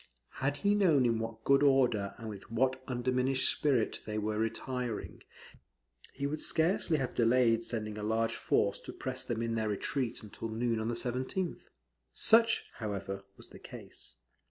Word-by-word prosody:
Had 140 +2 0
he 205 - +5
known 170 -11 +4
in 115 -2 +2
what 115 0 -5
good 140 0 +4
order 125 -8 +3
and 115 -2 -8
with 105 -3 -8
what 130 +3 +1
undiminished 130 +1 +1
spirit 130 -7 +2
they 105 0 -3
were 105 0 -1
retiring, 120 +1 -3 0.9
he 140 - -3
would 150 +2 -2
scarcely 165 0 +2
have 130 -3 -2
delayed 115 -1 +3
sending 110 -2 -4
a - - -5
large 110 +1 +1
force - - +1
to - - -9
press 130 0 -2
them 115 -1 -2
in 115 0 -1
their 110 -1 0
retreat 115 +4 -2
until 110 +2 -7
noon 115 0 0
on 110 - -2
the 120 - -1
17th. 130 +10 -2 0.5
Such, 230 +1 +4
however, 100 -2 -4
was - - -11
the - - -13
case. - - -9
120 Hz, 165 wpm, -32 LUFS, 110-135 Hz, 0.9 s, he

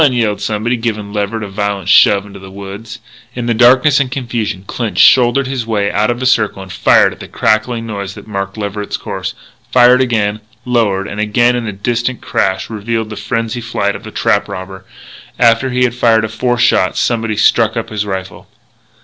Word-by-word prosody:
yelled 110 -4 0
somebody, 110 +3 -1
giving 105 -3 -4
Leverett 105 +1 -2
a - - -5
violent 100 -1 -3
shove 100 +1 +5
into 100 -1 -11
the 95 0 -11
woods. 100 +4 -9 0.4
In 120 -1 -3
the 120 - +1
darkness 130 +5 +5
and 135 -2 0
confusion, 120 -7 -3
Clinch 115 +1 -4
shouldered 125 +2 +5
his 130 -3 -4
way 105 -3 0
out 105 +2 +1
of 120 0 -1
the 130 - -3
circle 110 -6 +1
and 95 -2 -10
fired - - +4
at - - -17
the - - -9
crackling 115 +2 0
noise 100 -3 -5
that - - -11
marked 100 -1 -4
Leverett's 105 0 -4
course, - - -5 0.4
fired 125 0 +5
again, 110 -4 0 0.3
lower, 110 -6 +1
and 105 - -6
again 120 +3 +2
as 120 -1 -3
a 110 - -3
distant 115 +4 -2
crash 95 0 -1
revealed 110 0 -3
the - - -5
frenzied 115 +1 -3
flight 100 -3 -1
of - - -7
the - - -8
trap - - 0
robber. 95 0 -8 0.5
After 120 +2 +3
he 125 0 +1
had 125 -2 +1
fired 115 -2 +2
a - - -5
fourth 120 +2 -1
shot, 95 -2 +2
somebody 115 -3 0
struck 115 +1 +3
up 115 - -3
his 105 -1 -2
rifle. 95 -2 -6
110 Hz, 195 wpm, -15 LUFS, 100-120 Hz, 0.5 s, shove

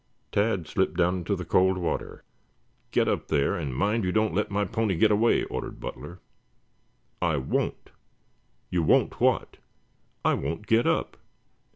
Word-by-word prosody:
Tad 100 -4 +1
slipped 95 +3 -1
down 90 +1 +2
into 85 - -1
the - - -6
cold 95 0 +3
water. 90 -2 -3 0.7
"Get - - +2
up - - -1
there, 70 -3 +1
and 70 -7 -4
mind 105 - +1
you 90 - 0
don't 110 -2 +1
let 105 +4 0
my 100 0 0
pony 110 -1 -1
get 80 - +4
away," 110 +3 +3
ordered - - -5
Butler. 90 +1 -8 1.0
"I 85 -4 +1
won't!" 65 - -2 0.8
"You 90 - +1
won't 80 - +2
what?" - - +1 0.7
"I - - +4
won't 85 +6 -3
get 115 +2 +3
up." - - 0
95 Hz, 155 wpm, -27 LUFS, 85-105 Hz, 1.0 s, get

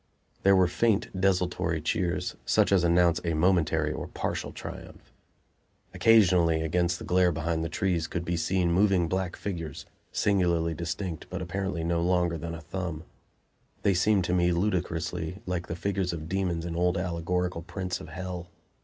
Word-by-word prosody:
There 100 0 +5
were 95 -1 +5
faint, 110 +3 +1
desultory 90 -3 +1
cheers, 85 +1 -1
such - - +2
as 95 -3 +4
announce 85 0 +3
a 85 -2 0
momentary 80 -3 +2
or - - -5
partial - - -3
triumph. - - -10 0.8
Occasionally, 90 -7 +4
against 85 +2 +1
the - - -8
glare 90 0 +3
behind 80 0 -1
the 80 - -2
trees, 85 -1 0
could 85 -1 -4
be 85 +1 -1
seen 90 +1 +1
moving 95 -1 +3
black 95 0 -2
figures, 85 -7 -5 0.3
singularly 85 -5 +1
distinct 85 +1 -4
but 95 - -4
apparently 95 -1 -3
no 85 0 0
longer 90 -1 +1
than 85 +1 -5
a 80 - -8
thumb. 85 -1 -5 0.8
They 100 - +4
seemed 95 +2 +3
to 90 - -1
me 90 -1 +3
ludicrously 85 -1 -2
like 90 -1 -3
the 85 - -4
figures 95 -1 -1
of 80 -2 -6
demons 90 -2 -1
in 85 -1 -4
old 90 +1 +1
allegorical 90 0 -1
prints 90 0 -4
of - - -10
hell. 90 +1 -6
90 Hz, 160 wpm, -28 LUFS, 85-95 Hz, 0.8 s, There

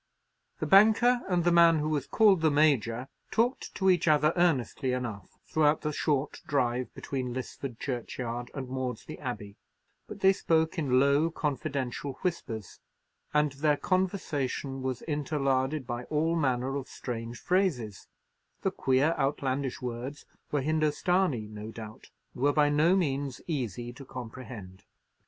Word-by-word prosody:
The - - -2
banker 225 +5 +6
and 175 -2 +2
the 175 - +3
man 170 -1 +6
who 155 0 -1
was 145 -3 -1
called 200 -6 +4
the 160 - +4
Major 135 -5 +2 0.2
talked 240 +4 0
to 190 - 0
each 180 -3 +4
other 150 +1 +4
earnestly 135 - +1
enough 115 -6 -5
throughout 155 -1 +2
the 150 0 -2
short 145 -2 -1
drive 125 -3 0
between 125 -3 -4
Lisford 130 -1 -6
churchyard 120 -1 -4
and 135 -2 -4
Maudesley 130 -2 -5
Abbey; 105 -6 -6 0.5
but 205 -2 -9
they 190 0 +6
spoke 160 -2 +1
in 130 -5 +3
low 140 +4 +3
confidential 140 -3 -3
whispers, 115 - -4 0.5
and 150 -1 +2
their 145 +2 +1
conversation 150 -8 -1
was 130 -1 -3
interlarded 140 -2 0
by 120 0 -4
all 160 +2 0
manner 130 -3 0
of 135 - -5
strange 115 -1 -6
phrases; 145 - 0 0.6
the - - +1
queer, 135 +5 +2
outlandish 135 -2 -1
words 125 +4 -5 0.3
were 145 -2 0
Hindostanee, 155 - +1
no 105 0 -8
doubt, 110 -1 -10 0.2
and - - -9
were 145 +1 +4
by 150 -1 +4
no 155 +5 +4
means 140 -6 -1
easy 120 - -3
to 135 - -11
comprehend. 120 -7 -9
140 Hz, 140 wpm, -29 LUFS, 125-160 Hz, 0.6 s, banker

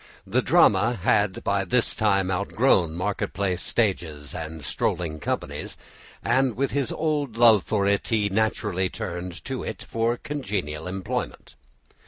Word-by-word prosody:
The - - +1
drama 105 +5 +4
had 105 -1 +1
by 100 0 +1
this 115 +5 +2
time 100 -3 +1
outgrown 95 -3 +2
market 95 +3 -2
place 95 -3 -1
stages 80 - -1
and 80 -3 -6
strolling 80 -3 -1
companies, - - -4 0.5
and 125 0 +2
with 135 +1 0
his 140 -3 -1
old 145 -7 -1
love 115 -4 +7
for 100 0 0
it 100 0 +1
he 110 -3 +2
naturally 100 -2 0
turned 90 0 -6
to - - -3
it - - -6
for 115 +1 +1
a - - -6
congenial 95 - -4
employment. 95 0 -4
100 Hz, 145 wpm, -25 LUFS, 90-115 Hz, 0.5 s, love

